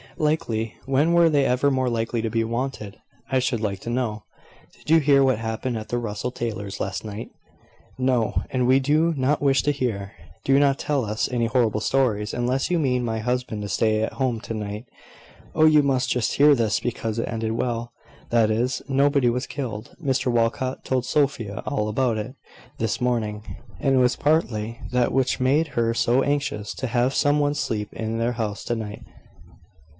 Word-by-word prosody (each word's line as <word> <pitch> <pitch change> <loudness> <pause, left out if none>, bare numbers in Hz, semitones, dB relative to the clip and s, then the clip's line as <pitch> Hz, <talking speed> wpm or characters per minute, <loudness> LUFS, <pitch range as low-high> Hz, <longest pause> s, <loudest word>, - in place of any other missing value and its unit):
"Likely! 115 -8 -1
when 140 +5 +2
were 170 -1 +5
they 145 -3 +3
ever 130 +2 +2
more 130 -1 +1
likely 115 0 -1
to 115 - -1
be 115 +1 0
wanted, 115 -3 -4 0.3
I 130 - +3
should 125 -3 -1
like 100 -3 -2
to - - -6
know! 120 -3 -2 0.5
Did - - -14
you 165 +1 +6
hear 140 -2 +4
what 130 -3 +3
happened 115 +2 -3
at 110 - -7
the 120 - -1
Russell 115 +2 -3
Taylors' 105 -5 -4
last - - -3
night?" 105 +1 -6 0.7
"No; 130 -3 +1
and 125 -1 0
we 130 +1 +5
do 155 +5 +2
not 140 +2 +1
wish 140 -1 +3
to 145 - +2
hear. 110 -8 -3 0.3
Do 135 -1 +4
not 140 -1 +3
tell 140 -5 0
us 105 +1 -1
any 120 -2 +1
horrible 115 -3 +1
stories, 110 -4 +1
unless 125 +2 0
you 180 - +2
mean 125 -5 +1
my 110 -1 -2
husband 125 -2 -2
to 105 - -5
stay 110 +2 +1
at 110 - -2
home 130 -4 -1
to 115 - -6
night." 105 +1 -5 0.7
"Oh, 155 - +5
you 155 -1 +6
must 135 -2 +1
just 125 -3 0
hear 145 +1 +6
this, 110 -6 +1
because 115 -2 -3
it 115 - -1
ended 110 -1 -2
well; 120 0 -2 0.4
that 115 -2 +3
is, 120 +4 0
nobody 140 -1 +3
was 125 +2 -2
killed. 120 -6 -6
Mr 130 -2 +1
Walcot 120 +2 0
told 130 -1 -1
Sophia 125 -8 0
all 105 -7 -1
about 115 +1 0
it 110 +5 -5 0.4
this 110 0 -1
morning; 110 -4 -1 0.4
and 135 -1 +2
it - - +4
was 125 0 +3
partly 120 -7 0
that 125 -1 +2
which 130 0 +1
made 145 +5 +2
her 115 -2 0
so 120 +2 +2
anxious 140 -7 -1
to 130 - -3
have 125 +2 +1
some 145 +1 +2
one 145 0 +2
sleep 105 -6 -2
in 110 0 -3
the 115 +1 0
house 110 -3 -3
to 120 - -1
night." 105 -2 -6
125 Hz, 190 wpm, -24 LUFS, 110-135 Hz, 0.7 s, you